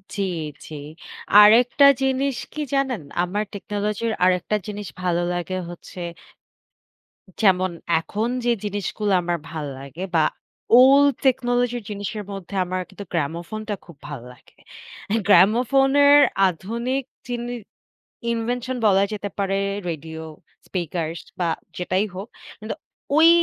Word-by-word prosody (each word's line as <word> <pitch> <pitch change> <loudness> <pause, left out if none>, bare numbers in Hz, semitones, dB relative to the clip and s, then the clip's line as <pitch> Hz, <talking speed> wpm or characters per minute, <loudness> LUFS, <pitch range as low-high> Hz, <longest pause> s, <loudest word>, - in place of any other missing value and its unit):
জি, 205 - -2 0.4
জি, - - -10 0.6
আরেকটা 235 +6 +7 0.2
জিনিস 265 0 +1 0.2
কি 305 - -4
জানেন? 265 -7 0 0.2
আমার 200 +4 -1
টেকনোলজির 210 +2 -2
আরেকটা 180 +2 +2
জিনিস 205 -1 -5
ভালো 175 -1 +1
লাগে 175 +1 -3
হচ্ছে 175 +1 -10 1.4
যেমন, 185 -3 +4 0.3
এখন 210 +7 -2 0.2
যে 240 - +3
জিনিসগুলো 205 0 -2
আমার 175 0 -1
ভাল 155 -2 -4
লাগে 140 +6 -8
বা 160 - +5 0.6
old 280 +2 +7
technology 245 -1 +2
জিনিসের 205 +1 -4
মধ্যে 195 0 -7
আমার 185 +1 -2
কিন্তু 200 +1 -9
gramophone 170 +7 -3
টা 205 - 0
খুব 170 -4 -14
ভালো 140 -5 -7
লাগে। 125 - -24 0.7
gramophone 240 +8 +5
এর 290 +1 +8 0.3
আধুনিক 235 +10 -3 0.2
জিনি 240 0 -3 0.8
invention 245 +2 -2
বলা 195 -1 +5
যেতে 205 -1 -3
পারে, 195 0 0 0.3
radio, 160 0 -5 0.5
speakers 165 -2 -3 0.2
বা 175 - +1 0.3
যেটাই 185 +3 0
হোক। 195 +4 -6 0.3
কিন্তু 215 +1 -4 0.4
ওই 320 +1 +8
205 Hz, 120 wpm, -23 LUFS, 180-245 Hz, 1.4 s, এর